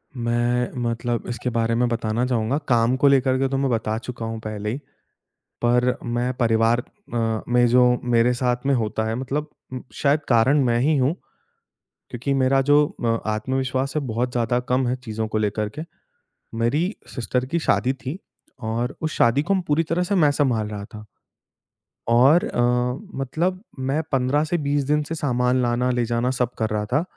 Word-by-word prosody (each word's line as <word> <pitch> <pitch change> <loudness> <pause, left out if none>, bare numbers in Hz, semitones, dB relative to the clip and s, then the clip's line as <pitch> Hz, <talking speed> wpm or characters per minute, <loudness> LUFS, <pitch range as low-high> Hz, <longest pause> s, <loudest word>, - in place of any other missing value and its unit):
मैं 120 +1 0
मतलब 120 0 -2
इसके 120 +1 -3
बारे 115 -1 0
में 120 +1 +2
बताना 115 +1 -1
चाहूँगा, 125 +2 0
काम 120 0 +3
को 140 - +4
लेकर 130 -1 +3
के 135 - +2
तो 135 - -1
मैं 135 -1 +1
बता 110 -1 -1
चुका 120 -1 -6
हूँ 115 0 -4
पहले 105 -1 -4
ही। 130 - -3 0.9
पर 125 +1 +3
मैं 120 +1 -1
परिवार 115 +1 +3 0.3
म 115 -2 0
मे 120 0 +5
जो 125 +1 +5 0.2
मेरे 120 0 +3
साथ 125 +1 -1
में 140 - +3
होता 110 -2 -1
है 110 - -1
मतलब 135 +4 -3 0.3
उ - - -3 0.2
शायद 145 +2 +2
कारण 130 +5 +4
मैं 120 -1 +2
ही 150 +3 +2
हूँ। 135 +5 +2 1.0
क्योंकि 130 +3 -2
मेरा 135 0 +3
जो 145 +2 +5 0.2
अ, 115 -1 +1
आत्मविश्वास 130 +4 -1
है - - +2
बहुत 120 +2 -1
ज़्यादा 120 0 +1
कम 125 0 +2
है 125 - 0
चीज़ों 110 -2 -3
को 110 - -1
लेकर 105 0 -1
के। 155 - -3 0.8
मेरी 150 - +1 0.2
सिस्टर 125 +1 -1
की 170 +6 -1
शादी 130 -4 +1
थी 135 +5 -6 0.4
और 115 +3 -2
उस 155 0 -2
शादी 120 +4 +4
को 195 - +1
पूरी 150 +3 +2
तरह 175 +2 +1
से 200 +3 -1
मैं 150 -5 +4
सँभाल 120 -7 +1
रहा 105 -1 -6
था। 105 0 -9 1.0
और 135 +8 +5
अ, - - -4 0.6
मतलब 175 +8 -1 0.3
मैं 150 +4 +1
15 135 +3 +2
से 170 +3 -1
20 145 0 +1
दिन 150 +2 +2
से 160 +2 -5
सामान 125 -3 +1
लाना, 120 +1 +1
ले 120 -1 0
जाना 120 +2 0
सब 125 -2 +1
कर 110 -1 -1
रहा 105 0 -1
था। 150 - +3
125 Hz, 185 wpm, -23 LUFS, 115-135 Hz, 1.0 s, मे